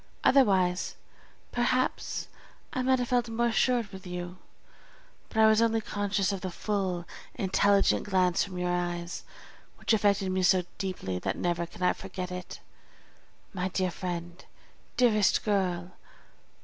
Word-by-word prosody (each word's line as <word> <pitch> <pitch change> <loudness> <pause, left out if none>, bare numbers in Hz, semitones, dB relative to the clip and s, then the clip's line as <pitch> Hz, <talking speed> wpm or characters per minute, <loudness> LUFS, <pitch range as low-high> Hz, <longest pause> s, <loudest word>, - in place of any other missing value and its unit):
Otherwise, 190 -8 +3 0.6
perhaps, 255 +1 0 0.5
I 255 - 0
might 260 +1 +3
have 245 -1 -2
felt 245 -2 +1
more 230 +1 0
assured 235 -2 +1
with 190 -1 -9
you; 180 0 -6 0.9
but - - -8
I 220 - +7
was 220 0 +5
only 225 -1 +3
conscious 205 -2 -1
of 195 -2 -4
the 185 - -3
full, 185 -2 -2 0.3
intelligent 200 +1 +3
glance 185 -2 +2
from 190 -2 -7
your 180 0 0
eyes, 175 -1 -3 0.5
which - - 0
affected 200 -3 +2
me 185 0 0
so 185 0 +4 0.2
deeply 185 - -3
that - - -2
never 170 -1 -1
can 180 - -8
I 180 - +4
forget 185 -1 -6
it. 180 0 -7 0.9
My 185 -1 -1
dear 185 -1 0
friend! 175 0 -5 0.5
dearest 215 -5 +4
girl! 185 -4 0
190 Hz, 140 wpm, -29 LUFS, 180-215 Hz, 0.9 s, I